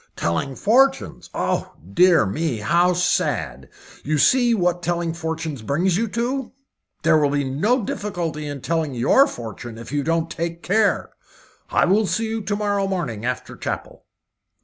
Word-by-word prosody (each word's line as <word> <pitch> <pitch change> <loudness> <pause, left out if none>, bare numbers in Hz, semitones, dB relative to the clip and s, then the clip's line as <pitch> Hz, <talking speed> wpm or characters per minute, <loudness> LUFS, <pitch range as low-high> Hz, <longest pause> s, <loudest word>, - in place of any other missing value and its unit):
"Telling 85 +11 -1
fortunes! 270 - +2
Oh! - - -2 0.2
Dear 180 - +5
me! 145 +5 -2
How 175 +11 +2
sad! 80 - -1 0.3
You 155 +2 0
see 240 - +4
what 175 -3 0
telling 170 -1 -1
fortunes 160 -4 -4
brings 170 - +1
you 225 +4 0
to? 245 +5 -2 0.5
There 160 -1 +5
will 145 -1 +2
be 145 0 0
no 205 - +1
difficulty 170 -7 -4
in 145 -2 -6
telling 160 -3 -1
your 195 - +4
fortune 115 0 -8
if 115 +1 -9
you 145 0 0
don't 165 +1 0
take 170 0 -4
care. 210 +2 +1 0.6
I - - +3
will 205 +3 +3
see 225 +3 -1
you 225 0 -3
to 205 0 -2
morrow 205 -1 0
morning 140 - -3
after 125 -2 -4
chapel." - - -6
170 Hz, 155 wpm, -22 LUFS, 140-200 Hz, 0.6 s, Dear